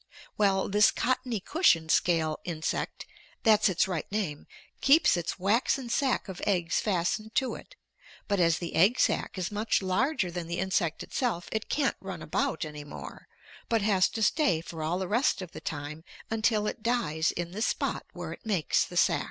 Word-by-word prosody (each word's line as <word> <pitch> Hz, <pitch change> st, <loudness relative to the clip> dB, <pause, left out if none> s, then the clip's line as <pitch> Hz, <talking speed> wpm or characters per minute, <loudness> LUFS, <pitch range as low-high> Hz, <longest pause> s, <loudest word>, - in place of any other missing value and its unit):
Well, 195 Hz, -2 st, +2 dB
this 210 Hz, +1 st, +5 dB
cottony 255 Hz, -3 st, -1 dB
cushion 190 Hz, -, +2 dB
scale 160 Hz, -2 st, +2 dB
insect 165 Hz, -3 st, -3 dB, 0.4 s
that's 215 Hz, -2 st, +5 dB
its 190 Hz, +3 st, +2 dB
right 180 Hz, -2 st, -4 dB
name 190 Hz, -9 st, -3 dB, 0.3 s
keeps 290 Hz, -, +5 dB
its 175 Hz, -1 st, -3 dB
waxen 235 Hz, +6 st, +1 dB
sac 265 Hz, -3 st, +1 dB
of 190 Hz, -2 st, -7 dB
eggs 175 Hz, -5 st, +1 dB
fastened 210 Hz, +3 st, -1 dB
to 260 Hz, -1 st, +1 dB
it, -, -, -11 dB, 0.5 s
but 200 Hz, -1 st, +1 dB
as 165 Hz, -2 st, +3 dB
the 170 Hz, -, -5 dB
egg 205 Hz, +9 st, +4 dB
sac -, -, +1 dB
is 185 Hz, +1 st, -2 dB
much 210 Hz, +2 st, +1 dB
larger 190 Hz, -, 0 dB
than 170 Hz, -1 st, -5 dB
the 170 Hz, +1 st, -3 dB
insect 185 Hz, -3 st, 0 dB
itself, 225 Hz, -10 st, -2 dB
it 220 Hz, 0 st, -3 dB
can't 285 Hz, -2 st, +1 dB
run -, -, -6 dB
about -, -, -1 dB
any 150 Hz, -1 st, -8 dB
more, 145 Hz, -, -10 dB, 0.4 s
but 225 Hz, -3 st, +2 dB
has 195 Hz, -3 st, +3 dB
to 220 Hz, -, 0 dB
stay 210 Hz, -, +2 dB
for 165 Hz, 0 st, -8 dB
all 160 Hz, +3 st, -1 dB
the 190 Hz, 0 st, -3 dB
rest 240 Hz, +10 st, +2 dB
of 185 Hz, -3 st, -7 dB
the -, -, -9 dB
time 150 Hz, +1 st, -5 dB, 0.3 s
until 220 Hz, -1 st, +1 dB
it 215 Hz, -, -3 dB
dies 170 Hz, -10 st, 0 dB
in 170 Hz, 0 st, -4 dB
the 205 Hz, +4 st, -5 dB
spot -, -, -1 dB
where -, -, -6 dB
it -, -, -14 dB
makes 195 Hz, -, +1 dB
the -, -, -7 dB
sac. -, -, +4 dB
190 Hz, 185 wpm, -28 LUFS, 170-225 Hz, 0.5 s, this